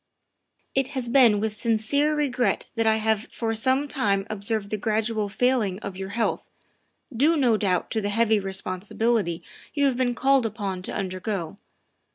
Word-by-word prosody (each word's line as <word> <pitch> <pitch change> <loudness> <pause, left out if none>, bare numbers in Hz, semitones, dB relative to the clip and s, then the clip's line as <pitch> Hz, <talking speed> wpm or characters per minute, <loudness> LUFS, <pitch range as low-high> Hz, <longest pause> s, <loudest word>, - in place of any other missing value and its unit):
" - - -53 0.3
It 270 -1 +1
has 245 -2 -1
been 235 -5 +5
with 215 0 -2
sincere 235 +7 +1
regret 255 -8 0
that 225 -1 0
1 220 0 +4
have 220 -1 0
for 225 -1 -2
some 260 +5 +1
time 200 -9 0
observed 210 0 -3
the 215 - 0
gradual 215 0 -1
failing 230 -4 +1
of 200 - -6
your 190 0 -6
health, 225 +2 -2 0.7
due 305 +7 +3
no 250 -6 +3
doubt 190 -4 0
to 220 - 0
the 205 - -2
heavy 220 0 +2
responsibilities 195 0 -1 0.3
you 285 -1 +2
have 265 -3 +1
been 245 -1 0
called 265 -1 +3
upon 200 -4 -4
to - - -3
undergo. 185 -1 -4
220 Hz, 170 wpm, -25 LUFS, 200-245 Hz, 0.7 s, been